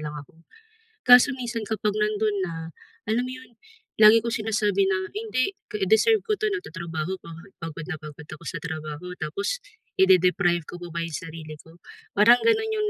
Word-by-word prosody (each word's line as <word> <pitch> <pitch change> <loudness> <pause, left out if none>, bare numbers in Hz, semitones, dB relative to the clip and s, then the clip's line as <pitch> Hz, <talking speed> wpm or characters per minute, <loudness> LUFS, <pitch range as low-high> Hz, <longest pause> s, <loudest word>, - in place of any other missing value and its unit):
lang 150 0 -6
ako." 155 +3 -13 0.6
Kaso 250 +2 +7
minsan 240 -3 -4
kapag 210 -1 -1
nando'n 210 0 0
na, 170 - -6 0.6
alam 235 +3 +1
mo - - -6
'yon, 255 -1 -15 0.5
lagi 215 +1 +8
ko 235 - -2
sinasabi 210 -3 +1
na, 190 -1 0
"Hindi, 420 - -1 0.4
deserve 410 - +4
ko 440 - -2
'to. 430 - +1
Nagtatrabaho 170 - -4
ako, - - -12 0.3
pagod 165 -2 -6
na - - -2
pagod 150 0 -10
ako 155 - -10
sa 185 - -4
trabaho, 160 +2 -6
tapos 200 - -2 0.4
i-de-deprive 180 -2 +4
ko 175 - -9
pa 175 - -7
ba 170 - -2
'yong 165 - -8
sarili 160 -2 -8
ko?" 165 +1 -18 0.4
Parang 235 +4 +7
gano'n 445 -1 +2
'yong 425 -1 0
195 Hz, 170 wpm, -25 LUFS, 165-240 Hz, 0.6 s, lagi